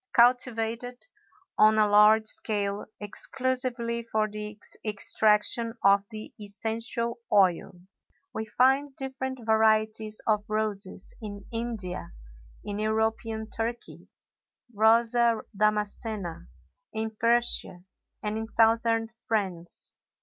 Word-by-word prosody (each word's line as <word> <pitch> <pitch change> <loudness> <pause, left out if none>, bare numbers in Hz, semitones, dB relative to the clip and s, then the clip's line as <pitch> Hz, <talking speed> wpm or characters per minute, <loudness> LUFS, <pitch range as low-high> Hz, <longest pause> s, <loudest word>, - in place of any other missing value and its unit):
Cultivated 245 0 +2 0.5
on 215 0 +6
a 215 -1 +4
large 210 +1 +6
scale 205 -2 -1
exclusively 240 +2 -1
for 220 -2 -1
the 210 0 -7 0.3
extraction 215 +2 +2
of 200 0 +5
the 215 -1 -8
essential 230 +3 -2
oil, 185 -3 +2 0.5
we 220 - -3
find 265 +5 +2
different 265 -3 -5
varieties 220 -1 +2
of 210 -2 +2
roses 210 -3 -3
in 205 -2 -8
India, 220 - -4 0.5
in 205 0 -4
European 220 0 -1
Turkey 235 +1 -5 0.7
(Rosa 230 +2 +3
Damascena), 210 -3 -1 0.5
in 220 0 -2
Persia, 230 -6 +1 0.4
and 210 +1 -2
in 225 - -5
Southern 225 0 +2 0.2
France. 185 -6 -3
220 Hz, 95 wpm, -27 LUFS, 210-235 Hz, 0.7 s, on